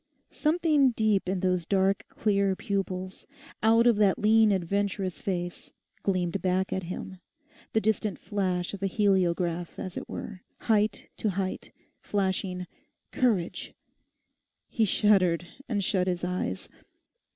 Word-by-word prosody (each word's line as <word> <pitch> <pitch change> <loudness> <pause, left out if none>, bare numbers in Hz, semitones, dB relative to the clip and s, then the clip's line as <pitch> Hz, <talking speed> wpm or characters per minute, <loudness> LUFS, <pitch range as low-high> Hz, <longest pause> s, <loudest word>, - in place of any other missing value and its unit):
Something 305 -3 +3
deep 215 -4 +1
in 190 -1 -1
those 180 -3 0
dark 195 0 +2
clear 200 -3 +1
pupils, 190 -3 -4 0.3
out 225 +2 +5
of 235 -3 +5
that 200 -3 +4
lean 220 0 +5
adventurous 190 -1 -1
face, 175 -2 -4 0.3
gleamed 185 -1 0
back 185 0 0
at 190 - -1
him, 185 +1 -7 0.5
the 220 - +3
distant 210 -4 0
flash 185 -4 -2
of 200 - -7
a 195 - +1
heliograph, 180 -4 +1
as 185 - -6
it - - -6
were, 190 -3 -7 0.2
height 215 -2 +1
to 215 - 0
height, 190 0 -3 0.3
flashing 190 -2 -1 0.5
'Courage!' 210 -9 0 0.9
He 225 - +2
shuddered, 185 -4 +3 0.2
and 205 -4 0
shut 185 -1 +1
his 180 -1 -1
eyes. 180 - -2
195 Hz, 130 wpm, -28 LUFS, 180-210 Hz, 0.9 s, out